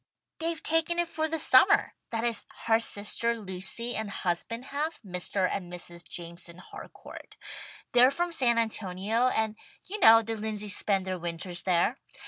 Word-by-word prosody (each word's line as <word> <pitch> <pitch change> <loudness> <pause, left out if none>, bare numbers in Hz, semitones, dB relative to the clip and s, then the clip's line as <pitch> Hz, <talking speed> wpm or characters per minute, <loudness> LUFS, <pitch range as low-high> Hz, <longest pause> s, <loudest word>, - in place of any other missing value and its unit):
"They've 330 0 -2
taken 325 +2 +1
it 345 0 +1
for 315 -1 -2
the 325 +1 -2
summer, 325 +7 +5 0.2
that 225 -1 -3
is, 235 -1 -2 0.2
her 225 0 +4
sister 230 +2 0
Lucy 195 +5 -1
and 220 -1 -3
husband 200 +6 -3
have, 305 +3 -2
Mr. 185 +1 0
and 180 -2 -5
Mrs. 175 -1 -6
Jameson 170 0 -7
Harcourt. 180 - -12 0.5
They're 245 +1 +6
from 345 +5 -2
San 245 -7 +3
Antonio, 220 +1 0
and 220 -3 0 0.3
you 420 +3 -5
know 225 - +8
the 225 +1 -4
Lindseys 210 -1 -2
spend 195 -2 +1
their 185 -1 -3
winters 175 +1 -4
there. 185 +8 +1
220 Hz, 155 wpm, -28 LUFS, 185-255 Hz, 0.5 s, know